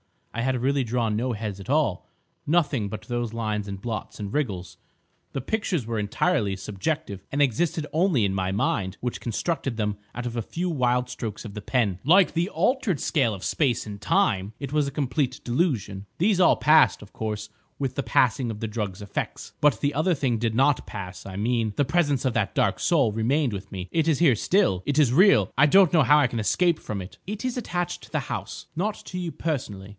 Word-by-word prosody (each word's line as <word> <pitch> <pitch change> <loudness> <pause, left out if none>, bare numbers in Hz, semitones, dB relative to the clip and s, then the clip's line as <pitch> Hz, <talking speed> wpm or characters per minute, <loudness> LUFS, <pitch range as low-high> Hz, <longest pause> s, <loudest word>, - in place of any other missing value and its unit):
I 115 - -2
had 130 0 0
really 135 +1 +1
drawn 115 -2 0
no 120 +3 -1
heads 105 -2 -5
at 95 - -10
all—nothing 145 - -1
but 105 +1 -6
those 120 0 -3
lines 105 -3 -2
and 100 -1 -5
blots 110 0 -5
and 100 -1 -5
wriggles. 95 - -2 0.6
The 135 - -2
pictures 180 - -1
were 115 -1 -2
entirely 105 - 0
subjective, 100 - -3
and 145 - 0
existed 150 +4 +1
only 160 - +3
in 95 - 0
my 95 -1 -1
mind 95 -1 -1
which 125 -1 -3
constructed 135 +2 -2
them 105 -2 -1 0.2
out 120 - -4
of 120 -1 -4
a - - 0
few 175 - -3
wild 125 -4 +1
strokes 115 -4 -5
of 105 -4 -8
the 105 - -6
pen. 105 -6 0
Like 180 +5 +6
the 170 +3 0
altered 240 - +1
scale 115 - +1
of 95 - -8
space 130 -7 +1
and 105 -1 -8
time 100 0 +1
it 140 -2 -6
was 150 -2 +2
a - - -3
complete 135 -2 -1
delusion. 115 - -1
These 190 +2 +2
all 180 - +6
passed, 155 0 +5
of 105 - -15
course, 105 -1 -4 0.3
with 135 -3 -2
the 140 - 0
passing 125 -1 +2
of 105 -2 -6
the 115 - -1
drug's 105 -3 -4
effects. 100 - -5
But 145 -6 +3
the 145 0 +1
other 160 +5 +2
thing 130 -5 0
did 115 -1 -1
not 135 +3 +2
pass. 90 -4 -7
I 95 - -7
mean, 110 +1 0
the 145 - +2
presence 145 -3 +1
of 130 - +1
that 100 -2 -1
Dark 100 - +1
Soul 140 -10 +3
remained 120 +4 +1
with 95 -1 -7
me. 95 -1 -6
It 165 -1 +1
is 155 -4 +3
here 150 -8 +5
still. 170 - +2
It 145 0 -1
is 140 -6 +4
real. 195 +7 +5
I 145 - +7
don't 190 +2 +5
know 160 -4 +6
how 145 +4 +6
I 150 - +4
can 115 - -4
escape 170 +9 +2
from 105 -2 -5
it." 90 - -10
"It 210 +3 -5
is 255 -1 -2
attached 175 -7 -3
to - - -14
the - - 0
house, - - -5
not 210 +4 0
to 180 - -5
you 175 -2 -3
personally. 115 -14 -4
125 Hz, 215 wpm, -25 LUFS, 105-150 Hz, 0.6 s, I